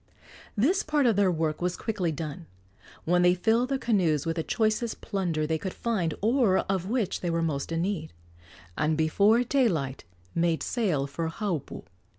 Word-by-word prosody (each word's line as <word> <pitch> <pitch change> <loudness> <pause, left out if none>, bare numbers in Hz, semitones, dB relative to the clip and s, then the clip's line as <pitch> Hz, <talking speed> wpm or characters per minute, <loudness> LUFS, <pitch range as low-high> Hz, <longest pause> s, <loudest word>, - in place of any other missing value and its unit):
This 340 - +3
part 300 -3 +1
of 230 -3 +4
their 200 -1 +3
work 160 -2 -1
was 180 0 -1
quickly 200 -7 -1
done, 160 +2 -6 0.6
when 175 +2 +3
they 180 0 +5
filled 225 +7 +2
their 275 - +1
canoes 180 - +1
with 165 +1 -2
the - - +1
choicest 220 +4 0
plunder 175 -7 -1
they 160 +1 -1
could 190 +3 -5
find 190 -10 -1
or 225 -3 +3
of 190 -1 -1
which 235 -5 -1
they 175 - -1
were 165 0 0
most 145 -2 -2
in 165 0 0
need, 180 -5 -3 0.6
and 155 +1 +1
before 200 +9 +3
daylight 180 - 0 0.3
made 165 -1 +1
sail 185 - 0
for 145 +4 -3
Haupu. 170 - -4
180 Hz, 170 wpm, -27 LUFS, 160-220 Hz, 0.6 s, they